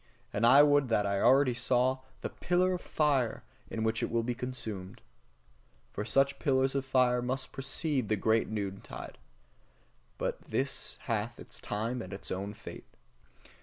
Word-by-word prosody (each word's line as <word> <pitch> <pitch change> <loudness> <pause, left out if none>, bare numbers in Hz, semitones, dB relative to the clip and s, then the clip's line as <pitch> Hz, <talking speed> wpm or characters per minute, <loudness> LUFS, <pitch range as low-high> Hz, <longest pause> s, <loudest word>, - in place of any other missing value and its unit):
And 115 +3 +3
I 135 +4 +9
would 145 -2 +4
that 110 -3 +2
I 100 0 0
already 130 +1 +5
saw 130 +1 +2 0.2
the - - -3
pillar 180 +1 +1
of 180 - -3
fire 140 -6 +1 0.3
in 110 - -3
which 110 0 0
it - - -1
will 115 0 +1
be 125 +1 -1
consumed! 110 -7 -6 0.9
For - - -3
such 135 +4 +2
pillars 135 -1 +2
of 135 -1 -1
fire 125 -2 +3
must 130 +2 -3
precede 135 -2 -1
the 110 - +3
great 110 +2 +2
noontide. 100 -3 -5 1.0
But - - -2
this 140 +1 -2
hath 115 0 -2
its - - -11
time 115 +4 -2
and 95 -2 -7
its 100 - -7
own 100 +3 -3
fate. - - -10
125 Hz, 160 wpm, -31 LUFS, 110-135 Hz, 1.0 s, I